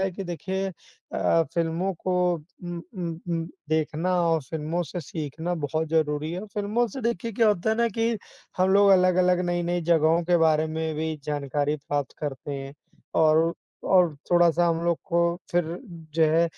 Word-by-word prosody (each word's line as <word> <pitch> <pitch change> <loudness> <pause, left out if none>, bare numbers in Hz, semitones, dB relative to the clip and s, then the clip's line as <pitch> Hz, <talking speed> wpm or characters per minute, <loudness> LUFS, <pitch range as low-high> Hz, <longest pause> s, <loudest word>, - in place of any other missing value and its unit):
है 190 0 +1
कि 190 +2 -6
देखिए 190 +2 -3 0.5
अ, 165 - +3
फ़िल्मों 170 +3 0
को 185 +2 -3 0.5
उम 175 -1 -5 0.2
उम 175 -2 -2 0.2
उम, 165 -1 -1 0.2
देखना 160 +3 0
और 165 -1 +2
फ़िल्मों 160 +5 -3
से 175 +2 -5
सीखना 160 +3 -4
बहुत 155 +3 -2
ज़रूरी 155 -1 0
है। 185 +4 -4
फ़िल्मों 210 +4 +1
से, 265 - -7
देखिए, 230 -1 -2
क्या 225 +1 +3
होता 210 +1 +1
है 220 - +1
ना 235 0 +2
कि 225 +1 0 0.5
हम 185 +1 +4
लोग 200 +1 +6
अलग-अलग, 180 -1 +4
नई-नई 175 0 0
जगहों 165 +1 +4
के 175 +1 +3
बारे 155 0 +3
में 160 0 -2
भी 160 +1 -2
जानकारी 145 0 -1
प्राप्त 145 -1 -3
करते 145 -1 -5
हैं 135 0 -6 0.5
और 160 +1 +4 0.3
और 180 -4 +4 0.2
थोड़ा-सा 175 -1 +4
हम 165 -1 +1
लोग 170 -1 +1
को 170 - 0 0.3
फिर 175 0 +2 0.5
जो 165 - +3
है 165 +2 +4
170 Hz, 170 wpm, -26 LUFS, 155-185 Hz, 0.5 s, लोग